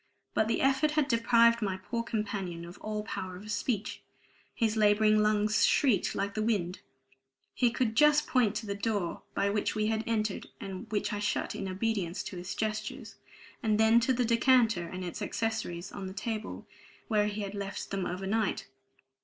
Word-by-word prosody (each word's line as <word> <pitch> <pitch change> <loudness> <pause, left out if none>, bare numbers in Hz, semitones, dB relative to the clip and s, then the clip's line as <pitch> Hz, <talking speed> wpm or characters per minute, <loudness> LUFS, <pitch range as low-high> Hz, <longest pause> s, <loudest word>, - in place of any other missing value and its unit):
But 220 - +2
the 230 - 0
effort 270 +3 +3
had 300 -3 +3
deprived 235 -1 +4
my 195 -3 -1
poor 230 +5 -3
companion 200 -7 -3
of 175 +2 -11
all 215 0 -3
power 190 -3 -5
of 210 +4 -8
speech; 210 0 -2 0.5
his 225 -2 +1
laboring 215 0 +4
lungs 210 0 +2
shrieked 260 -8 +3
like 200 +1 -1
the 215 - -2
wind; 200 -5 0 0.7
he 245 - +3
could 230 -1 -1
just 300 +4 +5
point 230 -5 +2
to 215 +1 -3
the 200 - -2
door 200 -4 -2
by 200 0 +1
which 210 0 -1
we 215 0 +1
had 220 0 -1
entered, 215 -3 -1
and 195 +3 -7
which 210 0 -1
I 205 - -2
shut 205 0 -1
in 195 - -4
obedience 190 -2 -2
to 185 - -7
his 175 +1 -5
gestures, 215 0 -4 0.4
and 215 -3 +1
then 220 +1 +6
to 245 +3 +1
the 250 -1 +1
decanter 230 -6 +3
and 185 +1 -6
its 175 +4 -6
accessories 205 -5 -3
on 195 -2 -6
the 190 - -7
table 220 +1 -4 0.4
where 210 -2 +2
he 210 0 -3
had 200 -1 -4
left 200 -1 -5
them 195 -2 -1
overnight. 195 +3 -1
215 Hz, 180 wpm, -30 LUFS, 195-230 Hz, 0.7 s, then